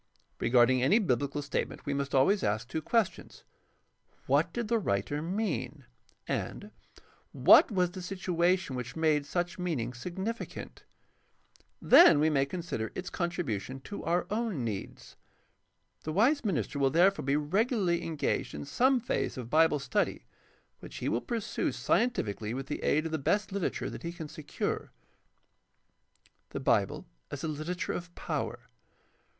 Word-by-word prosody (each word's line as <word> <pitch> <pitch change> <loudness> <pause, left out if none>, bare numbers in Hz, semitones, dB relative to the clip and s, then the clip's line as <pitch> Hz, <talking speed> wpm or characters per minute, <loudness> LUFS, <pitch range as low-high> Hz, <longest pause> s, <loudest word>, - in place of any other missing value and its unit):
Regarding 125 +1 +4
any 160 - +4
biblical 145 - 0
statement 140 - -3
we 145 - -1
must 140 0 -2
always 185 +10 +4
ask 110 +3 -1
two 160 +5 -3
questions: 225 +2 -1 0.8
What - - +2
did 235 -2 -3
the 230 +1 +2
writer 145 - -1
mean? 155 - -3 0.4
and - - -4 0.6
What - - +7
was 180 -3 +1
the 185 - -7
situation 180 -3 0
which 125 -1 -5
made 155 -3 +1
such 175 0 -2
meaning 140 -10 -2
significant? 190 - -6 0.9
Then 170 - +7
we 155 +1 +3
may 140 -2 +2
consider 170 -10 -4
its 185 - -5
contribution 135 - -3
to 205 +8 -7
our 175 +2 +1
own 215 - -1
needs. 105 -4 -6 0.8
The 155 - -4
wise 245 - +3
minister 165 -8 -1
will 135 -1 +3
therefore 180 +7 +3
be 140 +1 +1
regu 170 +10 +1
larly 175 -4 +1
engaged 160 - -2
in 75 0 -6
some 260 - +3
phase 235 - -2
of 120 -2 -7
Bible 160 -1 +4
study, 140 - -1 0.5
which - - -11
he - - -2
will 115 - 0
pursue 230 -3 -2
scientifically 115 - 0
with 135 +1 -4
the - - -5
aid 155 +2 +2
of 165 - -3
the 160 - -1
best 200 +9 0
literature 195 -2 -2
that - - -8
he 170 - -4
can 170 -3 -7
secure. 155 -1 -4 1.6
The - - -5
Bible - - +1 0.2
as 145 - -6
a - - -1
literature 155 +4 -3
of 175 0 -6
power. - - -3
160 Hz, 150 wpm, -30 LUFS, 135-190 Hz, 1.6 s, What